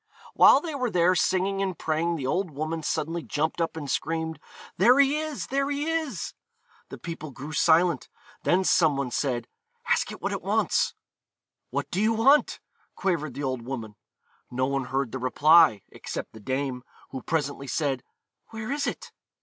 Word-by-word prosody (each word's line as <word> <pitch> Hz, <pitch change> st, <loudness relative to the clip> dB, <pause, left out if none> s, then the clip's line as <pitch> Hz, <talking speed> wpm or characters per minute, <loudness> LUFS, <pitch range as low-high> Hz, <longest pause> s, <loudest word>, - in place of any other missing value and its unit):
While 275 Hz, -, +7 dB
they 320 Hz, -2 st, -5 dB
were 255 Hz, -3 st, -1 dB
there 180 Hz, -2 st, +3 dB
singing 190 Hz, +2 st, +1 dB
and 190 Hz, -3 st, -2 dB
praying 165 Hz, +2 st, 0 dB
the 140 Hz, -5 st, -4 dB
old 180 Hz, +7 st, 0 dB
woman 155 Hz, +2 st, -3 dB
suddenly 160 Hz, +2 st, -2 dB
jumped 155 Hz, +2 st, -2 dB
up 165 Hz, -1 st, -2 dB
and 145 Hz, -3 st, -5 dB
screamed, 160 Hz, +3 st, -2 dB, 0.4 s
'There 240 Hz, +8 st, +6 dB
he 280 Hz, +2 st, +4 dB
is! 310 Hz, -2 st, -4 dB
there 275 Hz, +1 st, -1 dB
he 285 Hz, +1 st, -1 dB
is!' 320 Hz, -, -2 dB, 0.6 s
The -, -, -8 dB
people 165 Hz, -2 st, -7 dB
grew 140 Hz, +3 st, -8 dB
silent. 165 Hz, 0 st, +3 dB, 0.3 s
Then 185 Hz, +2 st, +2 dB
some 160 Hz, -6 st, +3 dB
one 135 Hz, -3 st, -2 dB
said, 120 Hz, -4 st, -1 dB, 0.4 s
'Ask -, -, +1 dB
it -, -, -9 dB
what -, -, -2 dB
it -, -, -3 dB
wants.' -, -, +1 dB, 0.7 s
'What -, -, -3 dB
do 190 Hz, -, 0 dB
you 220 Hz, +1 st, +3 dB
want?' 270 Hz, +7 st, +4 dB, 0.4 s
quavered 155 Hz, -8 st, -1 dB
the 145 Hz, -, -4 dB
old 130 Hz, -2 st, -2 dB
woman. 115 Hz, -4 st, -6 dB, 0.5 s
No 130 Hz, +1 st, 0 dB
one 135 Hz, -1 st, -1 dB
heard 135 Hz, -1 st, -2 dB
the 130 Hz, -, -4 dB
reply, 145 Hz, -, +5 dB
except -, -, -7 dB
the 110 Hz, -, -11 dB
dame, 130 Hz, +2 st, -3 dB, 0.3 s
who 130 Hz, -, -5 dB
presently 145 Hz, -3 st, -2 dB
said: 135 Hz, -2 st, -1 dB, 0.5 s
'Where 220 Hz, +2 st, -6 dB
is 285 Hz, 0 st, -1 dB
it?' -, -, -5 dB
160 Hz, 175 wpm, -26 LUFS, 135-195 Hz, 0.7 s, While